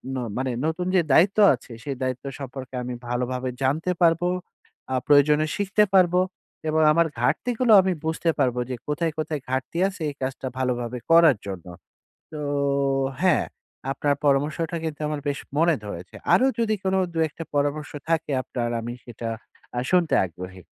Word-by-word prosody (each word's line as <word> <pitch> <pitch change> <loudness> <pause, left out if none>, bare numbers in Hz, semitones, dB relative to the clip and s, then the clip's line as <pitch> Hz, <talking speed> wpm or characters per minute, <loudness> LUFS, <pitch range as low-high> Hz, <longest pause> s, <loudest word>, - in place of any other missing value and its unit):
ন - - -2 0.2
মানে 130 0 -1
নতুন 160 +3 -1
যে 185 - +6
দায়িত্ব 185 +9 +5 0.2
আছে 125 - -17
সেই 140 -2 -3
দায়িত্ব 130 +1 -3
সম্পর্কে 135 -1 -7
আমি 125 0 -4 0.2
ভালোভাবে 125 +1 -2
জানতে 155 +7 +1
পারবো। 170 +1 +4 0.7
আ - - +2
প্রয়োজনে 150 +1 +5
শিখতে 205 +1 +2
পারবো, 180 -1 +5 0.5
এবং 160 +1 +2
আমার 170 +1 +3
ঘাটতি 210 - +1
গুলো 250 -3 +3
আমি 190 0 0
বুঝতে 160 +1 0
পারবো। 125 -3 +2
যে 130 - -2
কোথায়, 160 +3 0
কোথায় 155 -2 -2
ঘাটতি 130 +5 -2
আছে 195 -2 -8
এই 145 - -8
কাজটা 130 0 -3
ভালোভাবে 125 -1 -1
করার 165 -6 +7
জন্য। 95 -4 -6 0.7
তো 155 - -6 0.8
হ্যাঁ, 185 -4 +4 0.5
আপনার 145 +1 +1
পরামর্শটা 150 +4 +1
কিন্তু 155 -2 -4
আমার 150 -1 -3
বেশ 140 0 -1 0.2
মনে 165 +1 +4
ধরেছে। 90 -3 -8 0.2
আরো 260 - +4
যদি 220 -2 +2
কোন 190 0 +1 0.2
২ 165 - -4
১ 150 - -9
টা 165 - -4
পরামর্শ 145 +1 0 0.2
থাকে 160 -2 +1
আপনার 120 -2 -3
আমি 120 +1 -4
সেটা 120 -1 -6 0.5
আ - - +2
শুনতে 180 -3 +3
আগ্রহী। 90 +2 -10
145 Hz, 165 wpm, -24 LUFS, 130-170 Hz, 0.8 s, করার